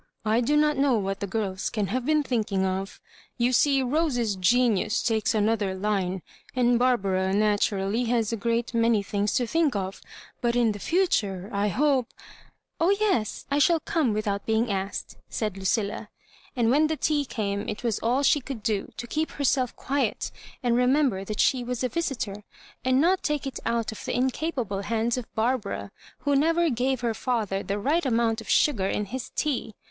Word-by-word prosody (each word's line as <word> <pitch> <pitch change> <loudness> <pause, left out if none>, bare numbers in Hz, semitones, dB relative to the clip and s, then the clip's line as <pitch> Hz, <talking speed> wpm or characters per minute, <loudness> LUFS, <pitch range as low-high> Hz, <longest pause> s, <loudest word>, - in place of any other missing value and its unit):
"I 220 +3 +3
do 295 +5 +2
not 300 -1 +3
know 275 -3 +3
what 195 -1 -2
the 200 - -3
girls 195 -2 -2
can 210 -3 -1
have 255 +1 -2
been 305 -1 +3
thinking 215 -7 0
of. 190 +1 -3 0.4
You 245 +1 +2
see 275 +1 +4
Rose's 250 -6 0
genius 215 +2 +2
takes 220 -1 +1
another 210 -2 +1
line; 190 -2 -1 0.3
and 245 -1 +3
Bar 250 0 +4
bara, 190 -2 0
naturally, 205 +1 +1
has 230 -2 0
a - - +1
great 235 +2 -1
many 230 -2 +3
thmgs 205 +1 -1
to 245 - +1
think 305 0 +1
of; 190 -1 -3 0.4
but 235 0 +1
in 235 -2 +3
the 205 - -6
future, 205 - 0
I 200 +1 +1
hope—'* 260 +2 +1 0.4
" - - -49
Oh, 335 - +4
yes; 380 - 0
I 285 - +2
shall 335 +2 +4
come 305 -5 0
without 210 -1 -2
being 220 0 +1
asked," 195 0 -4
said 215 -4 -2
Lucilla. 200 +2 -1 0.5
And 235 -2 +2
when 300 +4 +4
the 315 0 -2
tea 295 -1 +1
came 205 -4 -3
it 210 - -5
was 230 -4 0
all 250 +5 +1
she 290 +1 +4
could 245 -4 -7
do 210 -3 -1
to - - -5
keep 310 +6 -2
herself 260 -3 0
quiet, 280 +1 -1 0.3
and 240 -1 +2
remem 260 +3 +3
ber 190 -1 -5
that 210 +1 -5
she 255 -2 +3
was 250 0 -3
a 255 - +1
visitor, 235 -10 -3 0.4
and 255 +1 +3
not 360 +5 +3
take 300 -2 -1
it 270 - -4
out 230 -1 0
of 220 - -9
the - - -3
incapable 255 - -1
hands 230 +3 0
of 250 -3 -6
Barbara, 220 -3 -1 0.3
who 285 0 +1
never 330 +3 +3
gave 255 +1 0
her 235 -2 0
father 220 -5 -1
the 200 0 -3
right 295 +11 +1
amount 230 -3 +1
of 225 - -12
sugar 215 -11 +3
in 210 - -1
his 255 +5 -6
tea. 255 -7 -1
235 Hz, 190 wpm, -26 LUFS, 205-265 Hz, 0.5 s, see